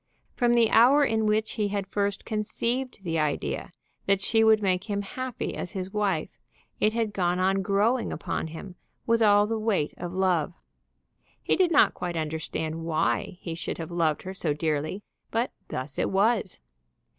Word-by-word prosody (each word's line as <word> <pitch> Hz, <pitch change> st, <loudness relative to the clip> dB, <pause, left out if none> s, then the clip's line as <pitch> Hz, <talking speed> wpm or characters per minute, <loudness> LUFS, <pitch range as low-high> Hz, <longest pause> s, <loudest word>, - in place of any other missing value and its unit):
From 240 Hz, -2 st, +3 dB
the 230 Hz, -2 st, +4 dB
hour 275 Hz, +6 st, +6 dB
in 220 Hz, -3 st, +1 dB
which 215 Hz, +1 st, +1 dB
he 210 Hz, -2 st, -1 dB
had 200 Hz, -1 st, -2 dB
first 200 Hz, 0 st, -2 dB
conceived 235 Hz, +2 st, -2 dB
the 165 Hz, -3 st, -1 dB
idea 150 Hz, -2 st, -2 dB, 0.4 s
that 195 Hz, -1 st, +3 dB
she 225 Hz, +3 st, +2 dB
would 220 Hz, -1 st, +5 dB
make 185 Hz, 0 st, +1 dB
him 205 Hz, 0 st, -1 dB
happy 255 Hz, +4 st, -4 dB
as 180 Hz, -, -5 dB
his 190 Hz, 0 st, -5 dB
wife, 200 Hz, -6 st, -1 dB, 0.4 s
it 215 Hz, -, +3 dB
had 225 Hz, -2 st, -1 dB
gone 180 Hz, -2 st, +1 dB
on 190 Hz, +1 st, +2 dB
growing 210 Hz, +5 st, +1 dB
upon 160 Hz, -, -3 dB
him 170 Hz, +4 st, -9 dB, 0.3 s
with 230 Hz, 0 st, +2 dB
all 205 Hz, -1 st, +5 dB
the 225 Hz, +1 st, -2 dB
weight 210 Hz, -9 st, 0 dB
of 175 Hz, 0 st, -5 dB
love, 180 Hz, -3 st, +1 dB, 0.9 s
He -, -, +2 dB
did 370 Hz, -2 st, +3 dB
not 295 Hz, -, +5 dB
quite 175 Hz, -2 st, -4 dB
understand 160 Hz, +1 st, -3 dB
why 165 Hz, +2 st, 0 dB
he 165 Hz, -, -5 dB
should 165 Hz, -, -4 dB
have 165 Hz, 0 st, -6 dB
loved 165 Hz, -3 st, 0 dB
her 190 Hz, -, -6 dB
so 165 Hz, -5 st, -1 dB
dearly, 155 Hz, +5 st, -2 dB, 0.3 s
but 230 Hz, +2 st, -1 dB, 0.2 s
thus 130 Hz, +2 st, -5 dB
it -, -, +1 dB
was. 200 Hz, 0 st, +1 dB
195 Hz, 175 wpm, -27 LUFS, 170-220 Hz, 0.9 s, hour